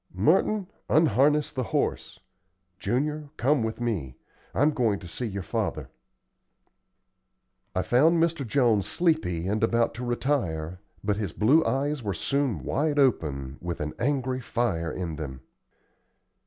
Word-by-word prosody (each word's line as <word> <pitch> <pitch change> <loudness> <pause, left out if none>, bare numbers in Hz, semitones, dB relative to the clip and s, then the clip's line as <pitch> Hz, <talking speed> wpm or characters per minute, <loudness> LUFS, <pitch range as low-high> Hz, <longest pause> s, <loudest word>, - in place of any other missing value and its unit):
Merton, 185 - +3 0.2
unharness 150 0 +3
the 130 - -2
horse. - - -2 0.6
Junior, 150 +6 -1
come 140 +1 +2
with 110 +1 -3
me; 95 - -2 0.4
I'm 145 +3 +3
going 115 -7 +1
to 90 - -10
see 120 +8 -4
your 100 -2 -4
father." - - -3 1.8
I 95 - +1
found 145 - +4
Mr. 165 -3 +1
Jones 115 -5 +2
sleepy 105 - 0
and 105 +3 0
about 115 +1 +2
to 120 +2 -6
retire, 95 - -1 0.2
but 100 0 0
his 100 -6 -3
blue 140 +10 +4
eyes 140 +1 0
were 100 -4 -2
soon 135 - -1
wide 150 - 0
open, 75 - +1
with 85 -1 -4
an 75 0 -3
angry 130 -1 0
fire 105 -9 -1
in 85 -3 -4
them. 65 -5 -6
120 Hz, 135 wpm, -27 LUFS, 90-145 Hz, 1.8 s, found